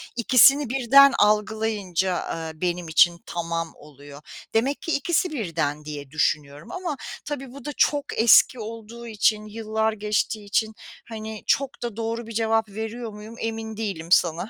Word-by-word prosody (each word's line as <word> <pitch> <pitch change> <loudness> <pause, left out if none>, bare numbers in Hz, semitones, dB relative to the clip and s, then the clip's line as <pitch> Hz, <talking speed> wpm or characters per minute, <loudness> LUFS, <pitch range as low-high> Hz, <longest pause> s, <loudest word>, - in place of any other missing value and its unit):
İkisini 255 +3 +5
birden 270 +2 +6
algılayınca, 210 -3 +1
aaa, 165 -2 -4
benim 175 -1 -2
için 170 +2 +4
tamam 165 -1 -3
oluyor. 145 -1 -14 0.3
Demek 260 +6 0
ki 330 - -3
ikisi 335 +5 0
birden 165 - -3
diye 145 -3 -7
düşünüyorum 150 0 -1
ama 360 -6 -4 0.3
tabii 275 -3 -6
bu 280 -2 -12
da 295 - -3
çok 290 -1 +2
eski 235 +2 +6
olduğu 230 +1 -8
için 215 -1 +1
yıllar 220 0 -2
geçtiği 210 0 -2
için 220 +2 0 0.4
hani 220 -1 -7
çok 275 -1 +2
da 235 -3 -4
doğru 230 +1 -4
bir - - -8
cevap 225 0 +1
veriyor 220 +3 -6
muyum 210 +2 -11
emin 225 -1 -4
değilim 195 -7 -4
sana. 175 +2 +3
220 Hz, 150 wpm, -24 LUFS, 175-235 Hz, 0.4 s, birden